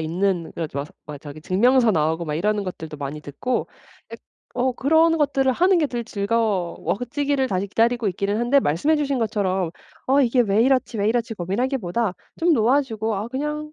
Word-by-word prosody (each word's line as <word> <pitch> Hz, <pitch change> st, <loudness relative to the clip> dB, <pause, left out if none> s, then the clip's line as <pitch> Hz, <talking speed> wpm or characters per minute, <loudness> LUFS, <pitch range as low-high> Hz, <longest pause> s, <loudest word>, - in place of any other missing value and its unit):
있는 175 Hz, +2 st, -1 dB
그래서 155 Hz, -4 st, -4 dB
막 145 Hz, -, -4 dB, 0.2 s
막 150 Hz, -1 st, -7 dB
저기 145 Hz, +1 st, -10 dB
증명서 235 Hz, +8 st, +3 dB
나오고 160 Hz, -1 st, 0 dB
막 150 Hz, -, -3 dB
이러는 205 Hz, +6 st, 0 dB
것들도 160 Hz, -4 st, -7 dB
많이 145 Hz, +1 st, -5 dB
듣고 150 Hz, -, -3 dB, 0.4 s
약 -, -, -7 dB, 0.4 s
어 255 Hz, +2 st, +2 dB
그런 320 Hz, +6 st, +3 dB
것들을 275 Hz, -3 st, +2 dB
하는 360 Hz, +7 st, +3 dB
게 300 Hz, -3 st, +1 dB
더 240 Hz, -, -3 dB
즐거워지기를 225 Hz, -, -1 dB
다시 190 Hz, -1 st, -1 dB
기다리고 230 Hz, +2 st, +1 dB
있기는 200 Hz, +3 st, -1 dB
한데 255 Hz, +4 st, +3 dB
말씀해 175 Hz, -, +1 dB
주신 280 Hz, -3 st, 0 dB
것처럼 190 Hz, -6 st, -1 dB, 0.3 s
'어 275 Hz, +2 st, +4 dB
이게 250 Hz, -1 st, +3 dB
왜 210 Hz, 0 st, +2 dB
이렇지, 255 Hz, -2 st, +1 dB
왜 205 Hz, 0 st, +1 dB
이렇지.' 230 Hz, 0 st, -1 dB
고민하기보다 210 Hz, +1 st, -1 dB, 0.3 s
좀 340 Hz, 0 st, +3 dB
놓아주고 225 Hz, -4 st, +1 dB
'아 205 Hz, -, -3 dB
그냥 300 Hz, +4 st, -4 dB
225 Hz, 380 characters per minute, -22 LUFS, 185-265 Hz, 0.4 s, 어